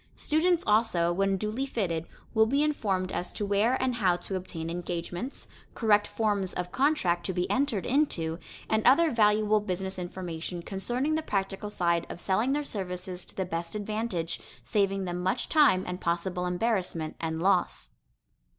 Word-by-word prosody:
Students 340 Hz, +3 st, +2 dB
also, 195 Hz, -6 st, +3 dB
when 195 Hz, +1 st, +1 dB
duly 215 Hz, +7 st, -2 dB
fitted, 170 Hz, -10 st, -2 dB, 0.3 s
will 220 Hz, 0 st, +5 dB
be 280 Hz, +5 st, +2 dB
informed 195 Hz, -11 st, 0 dB
as 180 Hz, -, -2 dB
to 205 Hz, -, -2 dB
where 205 Hz, +6 st, +2 dB
and 260 Hz, -1 st, +1 dB
how 185 Hz, -6 st, +3 dB
to 180 Hz, +2 st, -3 dB
obtain 175 Hz, -3 st, -4 dB
engagements, 175 Hz, +7 st, -4 dB, 0.3 s
correct 210 Hz, -2 st, +3 dB
forms 205 Hz, -4 st, 0 dB
of 180 Hz, 0 st, -3 dB
contract 255 Hz, -, +2 dB
to 190 Hz, -, -1 dB
be 180 Hz, +1 st, 0 dB
entered 260 Hz, -7 st, +1 dB
into, 180 Hz, -, +1 dB, 0.3 s
and 220 Hz, 0 st, +1 dB
other 315 Hz, +5 st, +5 dB
valuable 215 Hz, -2 st, +4 dB
business 190 Hz, -1 st, -3 dB
information 175 Hz, -1 st, -5 dB
concerning 240 Hz, -, -1 dB
the 315 Hz, -, +1 dB
practical 195 Hz, -5 st, -2 dB
side 170 Hz, -4 st, +1 dB
of -, -, -7 dB
selling 215 Hz, +8 st, +1 dB
their 295 Hz, +1 st, 0 dB
services 185 Hz, -6 st, -4 dB
to -, -, -13 dB
the 190 Hz, -, -1 dB
best 170 Hz, +1 st, -4 dB
advantage, 210 Hz, -5 st, -2 dB, 0.2 s
saving 195 Hz, -, +1 dB
them 175 Hz, 0 st, -3 dB
much 190 Hz, +7 st, 0 dB
time 290 Hz, -, +5 dB
and 180 Hz, 0 st, -5 dB
possible 180 Hz, +1 st, -1 dB
embarrassment 180 Hz, -4 st, -1 dB
and 160 Hz, -1 st, -2 dB
loss. 190 Hz, +4 st, +1 dB
195 Hz, 160 wpm, -28 LUFS, 180-225 Hz, 0.3 s, will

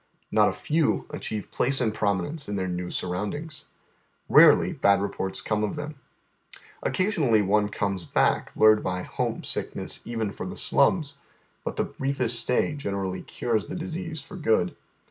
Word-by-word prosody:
Not -, -, +5 dB
a -, -, -3 dB
few 155 Hz, 0 st, 0 dB
achieve 105 Hz, -2 st, -5 dB
place 135 Hz, +2 st, +1 dB
and 110 Hz, -4 st, +1 dB
prominence 105 Hz, -, -1 dB
in 105 Hz, -, -2 dB
tlieir 95 Hz, -2 st, -2 dB
new 90 Hz, 0 st, -3 dB
surroundings. 145 Hz, -, -3 dB, 0.7 s
Karoly -, -, +7 dB
bad 100 Hz, -1 st, +5 dB
reports 95 Hz, -1 st, -3 dB
come 105 Hz, -1 st, 0 dB
of 105 Hz, -, -1 dB
them. 150 Hz, +1 st, -5 dB, 0.9 s
Occasionally 155 Hz, -, +2 dB
one 105 Hz, +1 st, +2 dB
comes 100 Hz, -3 st, -2 dB
back, -, -, +1 dB
lured 110 Hz, 0 st, +5 dB
by 90 Hz, 0 st, -2 dB
Iiomesick -, -, -3 dB
nesB -, -, -4 dB
even 115 Hz, -3 st, -2 dB
for -, -, -6 dB
the 200 Hz, -, -7 dB
slums; 150 Hz, -7 st, +2 dB, 0.5 s
but -, -, -4 dB
the -, -, +1 dB
briefest 130 Hz, -4 st, -1 dB
stay 125 Hz, +5 st, +1 dB
generally 100 Hz, -9 st, -3 dB
cures 115 Hz, -3 st, -2 dB
the 160 Hz, -, -5 dB
disease 170 Hz, -2 st, -4 dB
for 190 Hz, +6 st, -10 dB
good. 110 Hz, -, +1 dB
110 Hz, 155 wpm, -26 LUFS, 100-150 Hz, 0.9 s, Karoly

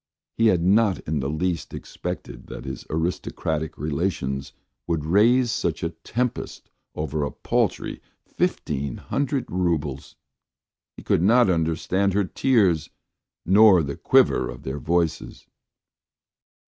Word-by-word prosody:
He 115 Hz, -, +3 dB
had 90 Hz, -5 st, +3 dB
not 100 Hz, +1 st, +3 dB
in 75 Hz, -1 st, -2 dB
the 70 Hz, +1 st, -2 dB
least 85 Hz, +2 st, -2 dB
expected -, -, -7 dB
that -, -, -8 dB
his 65 Hz, -, -7 dB
aristocratic 80 Hz, -1 st, -2 dB
relations 70 Hz, -3 st, -2 dB, 0.4 s
would 80 Hz, -3 st, -1 dB
raise 115 Hz, +8 st, +4 dB
such 85 Hz, -7 st, -2 dB
a 85 Hz, -, -1 dB
tempest 125 Hz, +7 st, -4 dB, 0.2 s
over 75 Hz, 0 st, -2 dB
a 70 Hz, -, -1 dB
paltry -, -, -1 dB, 0.2 s
fifteen 70 Hz, -3 st, -2 dB
hundred 140 Hz, -2 st, -2 dB
roubles! 80 Hz, -7 st, -2 dB, 0.8 s
He -, -, -10 dB
could -, -, +2 dB
not 115 Hz, +2 st, +5 dB
understand 85 Hz, +4 st, 0 dB
her 100 Hz, -, +3 dB
tears 95 Hz, -, +2 dB, 0.6 s
nor 95 Hz, -2 st, +6 dB
the 70 Hz, -1 st, -4 dB
quiver -, -, +3 dB
of -, -, -9 dB
their 65 Hz, +2 st, -4 dB
voices. 85 Hz, +1 st, -1 dB
85 Hz, 120 wpm, -24 LUFS, 75-100 Hz, 0.8 s, nor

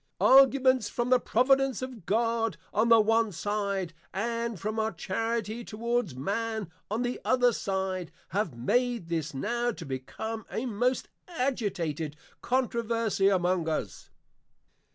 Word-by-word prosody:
Arguments 260 Hz, -3 st, +5 dB
from 240 Hz, +1 st, -2 dB
the 255 Hz, -, +6 dB
Providence 265 Hz, +1 st, +2 dB
of 250 Hz, -8 st, -8 dB
God, 230 Hz, +1 st, +1 dB, 0.2 s
on 220 Hz, +3 st, +2 dB
the 230 Hz, -1 st, +8 dB
one 225 Hz, 0 st, +3 dB
side, 200 Hz, -1 st, -2 dB, 0.2 s
and 230 Hz, 0 st, -2 dB
from 215 Hz, +4 st, -2 dB
our 220 Hz, 0 st, 0 dB
Charity 225 Hz, +5 st, -2 dB
towards 230 Hz, -, -2 dB
Man 205 Hz, -, -2 dB, 0.2 s
on 220 Hz, +4 st, -1 dB
the 245 Hz, 0 st, -3 dB
other 250 Hz, -2 st, +3 dB
side, 190 Hz, -3 st, -2 dB, 0.2 s
have 185 Hz, -, -2 dB
made 235 Hz, -, 0 dB
this 160 Hz, -3 st, -2 dB
now 240 Hz, -, 0 dB
to -, -, -8 dB
become 210 Hz, -, -5 dB
a 235 Hz, -, -3 dB
most 250 Hz, +2 st, 0 dB, 0.2 s
agitated 195 Hz, -, -2 dB, 0.3 s
Controversie 230 Hz, -5 st, +1 dB
among 180 Hz, -3 st, +1 dB
us. 115 Hz, -, -4 dB
220 Hz, 130 wpm, -29 LUFS, 190-240 Hz, 0.3 s, the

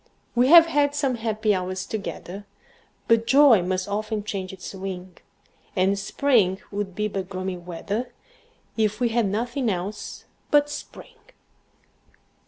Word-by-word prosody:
We've 285 Hz, +8 st, +8 dB
had 290 Hz, -3 st, +1 dB
some 275 Hz, -3 st, +1 dB
happy 220 Hz, -2 st, 0 dB
hours 185 Hz, 0 st, -3 dB
together, 200 Hz, -1 st, -6 dB, 0.6 s
But 230 Hz, 0 st, +3 dB
joy 270 Hz, -6 st, +7 dB
must 185 Hz, +1 st, -2 dB
often 210 Hz, +1 st, -2 dB
change 195 Hz, -3 st, -4 dB
its 190 Hz, 0 st, -8 dB
wing; 185 Hz, -2 st, -7 dB, 0.6 s
And 195 Hz, +1 st, +2 dB
spring 205 Hz, -4 st, +2 dB
would 200 Hz, -2 st, -4 dB
be 210 Hz, +1 st, 0 dB
but 195 Hz, -2 st, -4 dB
gloomy 185 Hz, -1 st, -4 dB
weather, 180 Hz, +7 st, -4 dB, 0.6 s
If 215 Hz, -1 st, 0 dB
we 245 Hz, -2 st, +2 dB
had 230 Hz, -2 st, +1 dB
nothing 240 Hz, +5 st, -1 dB
else 195 Hz, +2 st, -5 dB, 0.2 s
but 290 Hz, 0 st, +3 dB
spring. -, -, -9 dB
210 Hz, 130 wpm, -24 LUFS, 190-235 Hz, 0.6 s, We've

